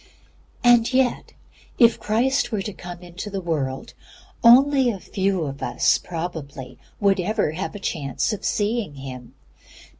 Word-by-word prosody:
'" - - -32
And 240 -1 +5
yet, 255 -1 0 0.4
if 235 -2 +5
Christ 240 +4 +1
were 205 -3 -1
to 210 - -5
come 175 -1 -9
into 175 +4 -7
the 195 -1 -4
world 145 -7 -3 0.5
again, 255 -2 +5
few 190 -2 -1
of 140 -1 -6
us - - +2
probably 160 -6 -7 0.2
would 200 -2 +2
ever 180 -4 0
have 185 +6 -5
a - - -6
chance 150 - -2
of 210 - -6
seeing 210 -6 -1
Him. 130 -3 -9
195 Hz, 145 wpm, -23 LUFS, 160-235 Hz, 0.5 s, And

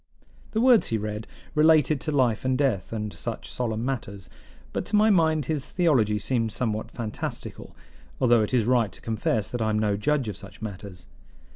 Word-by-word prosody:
The 220 - +1
words 245 -3 +5
he 115 - 0
read 105 0 -5 0.3
related 155 -2 +4
to 155 - -2
life 125 -6 +2
and 130 0 +1
death, 125 -10 0
and 105 -2 -4
such - - -5
solemn 115 -2 -2
matters; 100 -7 -5 0.4
but - - -1
to 210 - -1
my 215 +1 +5
mind 160 -5 +3
his 150 0 -3
theology 130 - +2
seemed 115 +1 -1
somewhat 110 -1 -2
fantastical, 110 -3 -6 0.4
although 120 -3 +4
it 105 - -1
is 120 -4 +2
right 120 -4 +2
to - - -12
confess 110 -2 -1
that 120 - -4
I 110 - +1
am 105 - +1
no 105 -2 +1
judge 140 +3 0
of 105 - -4
such 100 -1 -12
matters. 100 -4 -8
115 Hz, 185 wpm, -26 LUFS, 105-145 Hz, 0.4 s, words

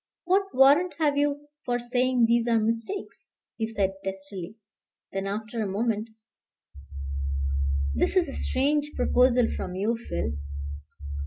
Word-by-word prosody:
What 380 +2 +3
warrant 290 +7 +6
have 300 -3 +2
you 290 0 0 0.2
for 245 -1 0
saying 245 0 +2
these 235 +1 +3
are 230 -1 +4
mistakes?" 230 - -3 0.3
he 220 - -1
said 200 -4 0
testily; 195 0 -6 0.6
then 195 0 -2
after 215 +3 -3
a 210 - 0
moment: 220 +2 -1 1.8
"This 75 - +1
is 365 -2 +4
a 275 - -6
strange 295 +3 0
proposal 250 -1 +4
from 180 - -4
you, 210 +5 +1
Phil. 85 -3 -1
235 Hz, 130 wpm, -27 LUFS, 210-285 Hz, 1.8 s, warrant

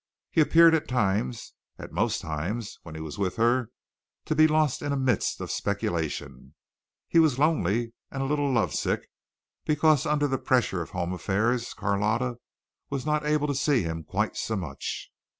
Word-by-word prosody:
He 160 - +4
appeared 165 +2 +6
at 160 - +1
times 115 0 -1 0.2
at - - -9
most - - 0
times 90 +9 -4
when 80 -2 -10
he 80 - -6
was 80 +3 -7
with 95 -2 -1
her 120 +1 +2 0.6
to - - 0
be 155 +1 +6
lost 155 -3 +1
in 145 - -2
a 140 - 0
mist 130 -5 0
of - - -4
speculation. 80 -3 -3 0.5
He 165 - +4
was 155 -6 +4
lonely 120 - +1 0.2
and 135 -1 -3
a - - -1
little 145 0 0
love 120 -4 +1
sick, - - -1 0.6
because 155 0 +3
under 145 -1 +2
the 135 -1 -1
pressure 120 -8 +1
of 85 - -6
home 90 0 -3
affairs 110 +7 0
Carlotta 110 +5 0 0.5
was 135 -1 -3
not 150 0 +1
able 150 -1 +2
to 145 - 0
see 135 -3 +2
him 80 0 -4
quite 100 +7 -1
so 110 - -2
much. 80 -9 -5
120 Hz, 175 wpm, -27 LUFS, 95-145 Hz, 0.6 s, appeared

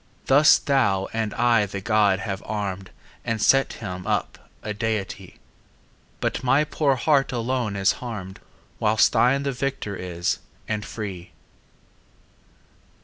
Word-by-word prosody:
Thus 145 +3 +6
thou 100 -9 +1
and 110 -2 -1
I 115 -3 +3
the 100 0 -5
god 100 -2 +2
have 95 -1 -4
arm'd 100 -3 -4 0.3
And 115 -1 -2
set 135 +5 +3
him 90 -4 -7
up - - -2
a 105 - -3
deity; 105 -3 -3 0.8
But - - -2
my 135 +4 +4
poor 150 -2 +1
heart 135 +1 +2
alone 120 -3 -1
is 95 0 +3
harm'd, 105 -6 -6
15 - - -30 0.3
Whilst 110 0 +3
thine 135 +3 +3
the 140 - -1
victor 125 -5 -3
is, 85 -2 -2 0.3
and 105 -1 -2
free! 100 -5 -7
110 Hz, 135 wpm, -24 LUFS, 100-125 Hz, 0.8 s, Thus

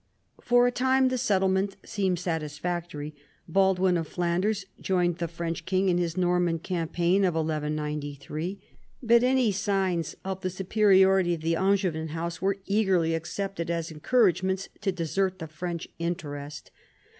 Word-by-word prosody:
For 245 0 +4
a 245 - +3
time 260 +1 +3
the 255 - -1
settlement 195 -3 +1
seemed 190 -4 0
satisfactory. 160 -2 -3 0.3
Baldwin 190 0 +3
of 165 -2 -3
Flanders 185 +5 -1
joined 175 -2 0
the 170 - -1
French 165 0 -4
king 190 0 +1
in 175 -1 +2
his 170 0 -2
Norman 180 -2 +2
campaign 175 +2 0
of 180 -3 +2
1193. 150 +2 -3 0.4
But 235 0 +5
any 250 -3 +3
signs 190 -4 -1
of 190 0 -4
the 185 - -1
superiority 190 -1 +3
of 160 - -9
the 165 +1 +1
Angevin 185 -4 +1
house 165 +2 -4
were 195 +1 +1
eagerly 190 -5 +2
accepted 170 +1 -3
as 170 0 -2
encouragements 190 +1 +1
to 200 -2 +1
desert 185 +2 -1
the 165 - -6
French 170 +2 -5
interest. 150 -4 -5
180 Hz, 140 wpm, -27 LUFS, 165-195 Hz, 0.4 s, But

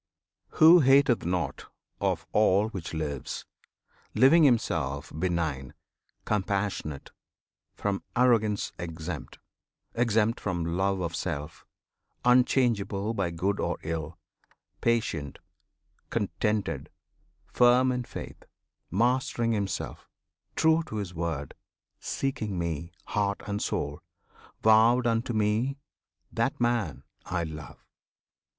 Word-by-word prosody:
Who 165 +3 +8
hateth 135 - +4
nought 90 -1 -2 0.3
Of - - -1
all 105 0 +3
which 95 -7 -6
lives, 75 -4 -4 0.7
living 155 +5 +6
himself 80 - 0
benign, 80 -7 -2 0.5
Compassionate, 100 -8 -2 0.6
from 100 -1 -2
arrogance 115 -4 +2
exempt, 85 -1 -6 0.6
Exempt 115 -1 +2
from 85 -4 -2
love 95 0 +1
of 85 -1 -3
self, 80 -3 -5 0.6
unchangeable 115 -5 +2
By 100 -5 -1
good 95 +4 -1
or - - -1
ill; 80 0 -4 0.6
patient, 95 -12 0 0.7
contented, 100 -9 -1 0.6
firm 125 +1 +4
In 125 0 -2
faith, - - -8 0.5
mastering 120 +2 +1
himself, 100 -3 -3 0.5
true 160 +1 +4
to - - -7
his 100 -4 -4
word, 80 -5 -3 0.5
Seeking 110 -8 -3
Me, 85 -1 -3
heart 100 -1 -1
and 105 0 -3
soul; 75 0 -2 0.6
vowed 115 +3 +5
unto 115 +1 +1
Me, 110 +6 +1 0.5
That - - -1
man 120 -7 0 0.2
I 90 -2 -2
love! 80 -4 -9
100 Hz, 100 wpm, -28 LUFS, 85-120 Hz, 0.7 s, Who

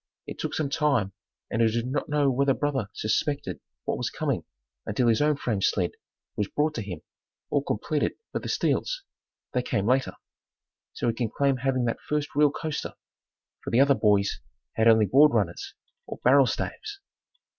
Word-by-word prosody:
It - - -8
took - - -3
some 145 -3 -1
time 140 - +1 0.4
and 115 - 0
I 115 - +5
do 115 +1 0
not 130 +5 -3
know 145 -2 +2
whether 135 +1 +2
brother 135 -8 -1
suspected 140 +7 -1 0.3
what - - -1
was - - -1
coming - - -2 0.4
until 115 +3 0
his 115 +1 +3
own 150 0 +3
frame 115 -7 -2
sled 90 -2 +1 0.4
was 105 - -1
brought 150 +5 0
to 115 - -3
him, 90 -6 -6 0.5
all 145 - +2
completed 145 +4 -1 0.2
but - - -2
the - - -5
steels - - 0 0.5
they 125 - +2
came 110 -5 -1
later. 130 +3 +2 0.8
So - - -2
he - - 0
can 115 -1 -2
claim 140 +3 +1
having 130 -1 0
had 115 - -1
the - - -26
first 150 -1 -1
real 150 0 +5
coaster, 155 +1 -4 0.7
for - - -4
the 115 - +3
other 140 +1 +6
boys 105 -5 +2 0.3
had 110 0 +2
only 110 -2 +6
board 140 +6 +5
runners 95 -6 -1 0.3
or - - -6
barrel 135 +1 +6
staves. 415 - -4
130 Hz, 180 wpm, -26 LUFS, 110-145 Hz, 0.8 s, other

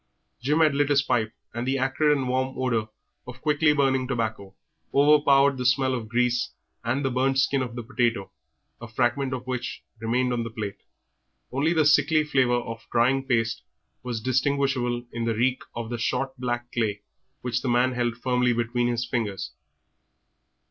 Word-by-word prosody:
Jim 150 +6 +2
had 155 -2 +4
lit 145 0 +1
his 140 -1 +4
pipe, 120 -5 0 0.2
and 120 +2 -3
the 135 +1 +1
acrid 145 +3 +2
and 130 -2 -2
warm 130 +1 -1
odour 115 -4 0 0.4
of 125 +1 -9
quickly 150 +1 +3
burning 135 -3 +1
tobacco 110 -6 -3 0.4
overpowered 140 -1 +4
the - - -1
smell 130 +1 +2
of 115 -4 -4
grease 125 +1 +1 0.3
and 130 +4 -1
the 135 - +1
burnt 135 +2 +1
skin 135 0 +2
of 120 -2 -4
the 120 - -5
baked 125 +3 -18
potato, 115 -5 +1 0.5
a 120 - -7
fragment 125 +4 0
of 130 -1 -4
which 125 -1 -4 0.2
remained 125 +3 0
on 120 - -1
the 115 - -5
plate; 105 -3 -6 0.7
only 140 +6 +1
the 160 -3 +3
sickly 150 +1 +4
flavour 130 -5 +2
of 115 -1 -8
drying 130 +3 +3
paste 115 -4 0 0.4
was 125 -2 -4
distinguishable 130 -1 0
in 115 -1 -2
the 115 -1 0
reek 125 +3 +1
of 115 0 -5
the 120 - -3
short 130 +3 -1
black 120 -1 -3
clay 105 -3 -1 0.4
which 125 0 -1
the 130 - -2
man 125 +2 +3
held 120 -2 -1
firmly 125 0 +1
between 120 +1 0
his 120 0 -1
teeth. 110 -5 -2
125 Hz, 175 wpm, -25 LUFS, 120-135 Hz, 0.7 s, had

